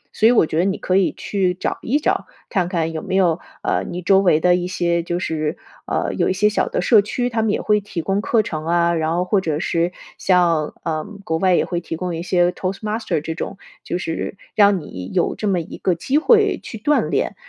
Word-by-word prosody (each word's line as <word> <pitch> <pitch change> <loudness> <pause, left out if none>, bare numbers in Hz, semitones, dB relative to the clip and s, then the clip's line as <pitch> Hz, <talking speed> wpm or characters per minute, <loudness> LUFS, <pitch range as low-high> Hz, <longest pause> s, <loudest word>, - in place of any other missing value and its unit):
所 220 - +5
以 - - +6
我 240 - +4
觉 155 +1 -2
得 175 - +3
你 195 0 0
可 185 - -1
以 190 -1 +3
去 185 -3 0
找 - - -3
一 265 +6 +1
找， - - 0 0.2
看 185 -4 0
看 165 -3 -1
有 160 -1 -4
没 190 -2 -3
有， 175 -3 +3 0.2
呃， - - 0
你 180 +1 -5
周 190 +2 +5
围 180 -5 +4
的 180 +2 +4
一 180 0 -2
些 170 -2 0
就 175 +1 -3
是 155 -1 -2 0.3
呃， - - -1
有 - - +1
一 - - +2
些 200 +3 +2
小 210 - 0
的 - - -1
社 215 +2 +6
区， 245 +4 -2
他 225 -1 0
们 220 - +1
也 - - +1
会 210 0 +2
提 195 -4 -5
供 195 +1 0
课 220 0 +2
程 155 -6 -4
啊， 170 0 +2
然 160 -1 0
后 180 +1 0
或 195 +1 +2
者 155 -4 -1
是 170 +1 0 0.3
像， 170 -5 +2
呃， 155 -2 -2 0.2
国 160 -3 -1
外 185 -1 +3
也 - - +2
会 175 -1 -3
提 165 - -5
供 180 +1 -3
一 165 - -4
些 175 0 +2
toast 185 +1 -4
master 215 -6 -2
这 160 +1 -4
种， 170 - -5 0.3
就 - - -2
是 170 +2 -4 0.2
让 200 -2 +4
你 95 - -8
有 175 - +2
这 210 - -4
么 190 -3 +2
一 165 - -8
个 185 - +1
机 265 - +1
会 430 +2 +4
去 225 - -8
锻 290 +8 +1
炼。 - - -1
180 Hz, 290 characters per minute, -20 LUFS, 170-205 Hz, 0.3 s, 以